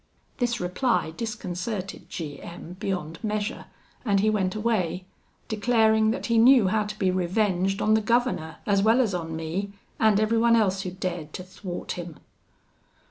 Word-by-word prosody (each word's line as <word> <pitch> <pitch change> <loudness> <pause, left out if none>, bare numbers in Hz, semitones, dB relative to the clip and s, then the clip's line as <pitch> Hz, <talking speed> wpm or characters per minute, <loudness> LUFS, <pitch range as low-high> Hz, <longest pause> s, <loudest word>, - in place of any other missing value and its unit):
This 240 -2 0
reply 180 -2 0
disconcerted 195 -2 -4
G 150 -4 -6
M 170 +1 -9
beyond 180 -5 -4
measure 215 +2 -2 0.4
and 200 -5 +2
he 215 +2 +3
went 195 -2 0
away, 200 -5 -1 0.4
declaring 220 0 +3
that 225 - -2
he 230 -1 +3
knew 240 -4 +6
how 215 +1 +1
to 210 +1 -6
be 190 -3 +2
revenged 185 +1 0
on 215 - +4
the 220 - +4
governor, 230 -8 0
as 200 -1 +3
well 225 +4 +4
as 225 -6 +2
on 165 -2 -3
me, 175 +5 -3 0.3
and 215 -2 +4
everyone 230 +2 +3
else 195 -4 +2
who 185 - -4
dared 175 -4 -5
to 185 - -6
thwart 185 -1 -7
him. 175 -3 -6
200 Hz, 160 wpm, -26 LUFS, 180-220 Hz, 0.4 s, knew